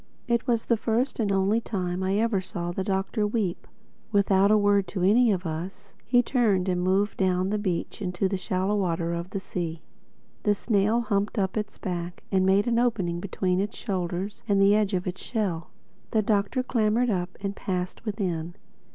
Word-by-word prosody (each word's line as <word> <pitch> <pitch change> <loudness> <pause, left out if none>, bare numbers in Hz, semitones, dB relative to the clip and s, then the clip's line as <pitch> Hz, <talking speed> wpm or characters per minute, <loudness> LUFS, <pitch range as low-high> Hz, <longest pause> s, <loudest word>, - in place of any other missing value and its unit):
It 235 -1 0
was 235 -2 +1
the 235 - +2
first 235 +5 0
and 210 -3 +1
only 195 +4 +2
time 185 -5 -3
I 190 +1 +1
ever 220 -3 +1
saw 175 -1 -4
the 190 +2 -2
Doctor 195 +3 0
weep. 205 -5 -2 0.4
Without 200 -1 +4
a 215 - +6
word 205 -2 +3
to 180 0 -3
any 225 +5 +5
of 185 -2 -1
us, 185 +5 -6
he 245 +2 +4
turned 215 -8 +2
and 180 -1 +1
moved 195 +3 +1
down 185 0 +1
the 210 - 0
beach 185 -1 -3
into 185 0 0
the 195 - -1
shallow 185 +2 -1
water 170 -4 0
of 170 +1 -4
the 195 - -3
sea. 170 -4 -4 0.6
The 205 -1 +2
snail 215 +2 +2
humped 205 -3 -1
up 190 -2 0
its 210 -1 -3
back 175 -2 -5
and 190 -1 +3
made 195 +2 +4
an 235 -1 +2
opening 195 -8 0
between 185 0 -1
its 200 +1 -2
shoulders 185 0 -3
and 200 -2 +3
the 195 +1 +6
edge 210 -2 +2
of 180 - -2
its 180 0 -4
shell. 190 -9 -2 0.4
The 220 -1 +2
Doctor 205 +4 +1
clambered 230 0 +1
up 180 -2 -2
and 200 0 -3
passed 180 0 -3
within. 180 -6 -3
195 Hz, 190 wpm, -26 LUFS, 180-215 Hz, 0.6 s, a